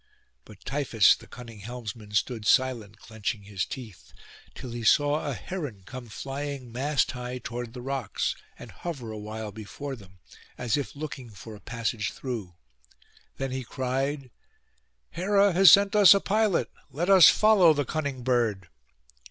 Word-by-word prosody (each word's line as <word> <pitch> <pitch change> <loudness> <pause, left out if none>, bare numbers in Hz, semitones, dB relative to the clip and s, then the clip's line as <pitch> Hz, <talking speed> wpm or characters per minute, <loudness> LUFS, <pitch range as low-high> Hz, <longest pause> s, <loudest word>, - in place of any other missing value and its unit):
But 105 -3 -16
Tiphys 135 -6 +3
the - - -16
cunning 115 -3 -11
helmsman 115 -1 -8
stood 110 0 -1
silent, 115 -6 +1
clenching 110 -1 -5
his 100 -1 -3
teeth, 110 -8 -10 0.4
till 130 -2 -8
he 120 0 -5
saw 145 +6 +3
a 135 - -3
heron 145 - -6
come 125 +2 -9
flying 135 +2 -6
mast 135 +1 0
high 125 0 -6
toward 120 -1 -6
the 125 -1 -8
rocks, 135 -6 -2 0.2
and - - -11
hover 135 -10 -6
awhile 110 0 -6
before 120 +7 -7
them, 95 -5 -16 0.4
as 120 -3 0
if 145 -1 -4
looking 140 -4 -7
for 110 +1 -11
a - - -13
passage 115 -2 -3
through. 110 -10 -6 0.8
Then 135 -1 -3
he 130 0 -3
cried, 135 +2 -3 0.8
'Hera 200 +2 +2
has 190 +1 +8
sent 200 +1 +5
us 205 -1 +8
a - - +3
pilot; 210 -1 +1 0.2
let 170 +5 -3
us 190 -3 +9
follow 210 -6 +5
the 145 -2 0
cunning 140 -4 -3
bird. 115 -8 0
125 Hz, 150 wpm, -27 LUFS, 110-145 Hz, 0.8 s, us